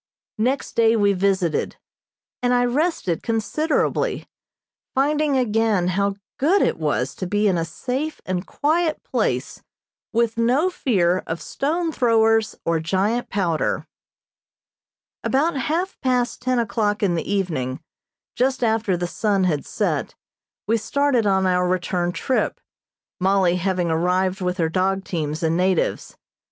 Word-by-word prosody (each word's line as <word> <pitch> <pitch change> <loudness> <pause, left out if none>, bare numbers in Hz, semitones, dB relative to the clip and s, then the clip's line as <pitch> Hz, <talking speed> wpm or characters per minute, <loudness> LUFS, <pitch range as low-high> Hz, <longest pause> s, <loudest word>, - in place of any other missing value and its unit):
Next 255 +5 -1
day 230 0 +4
we 205 -2 +3
visited, 190 -3 0 0.7
and 250 0 +2
I 245 0 +3
rested 245 - 0
considerably, 235 +8 0 0.7
finding 295 +1 +2
again 220 -6 +1
how 200 +2 0 0.2
good 350 +9 +3
it - - 0
was 145 -4 -1
to 185 - -3
be 210 +3 +1
in 190 - +2
a 165 - 0
safe 260 - -4
and 185 -1 -2
quiet 315 +1 0
place - - -2 0.5
with 235 0 0
no 265 +10 +2
fear 185 - +1
of 165 +1 -3
stone 325 +4 -1
throwers 225 -4 +2
or 165 -1 +1
giant 195 +8 0
powder. 175 -6 0 1.4
About 295 +5 +1
half 320 +9 -1
past 250 -3 0
ten 255 0 0
o'clock 215 -2 0
in 190 -3 +2
the 170 +3 -2
evening, 155 -10 -1 0.6
just 260 0 +1
after 220 -4 +1
the 175 - -2
sun 200 +2 0
had 155 -6 0
set, - - -2 0.5
we 225 +3 +2
started 255 0 +1
on 190 -1 +2
our 180 -1 +2
return 180 -1 0
trip, 255 +7 -1 0.6
Mollie 185 -1 +3
having 180 -2 0
arrived 185 +3 +1
with 180 0 -1
her 165 -3 +1
dog 190 +3 0
teams 155 -2 -3
and 160 0 +2
natives. 185 0 0
205 Hz, 135 wpm, -22 LUFS, 180-250 Hz, 1.4 s, day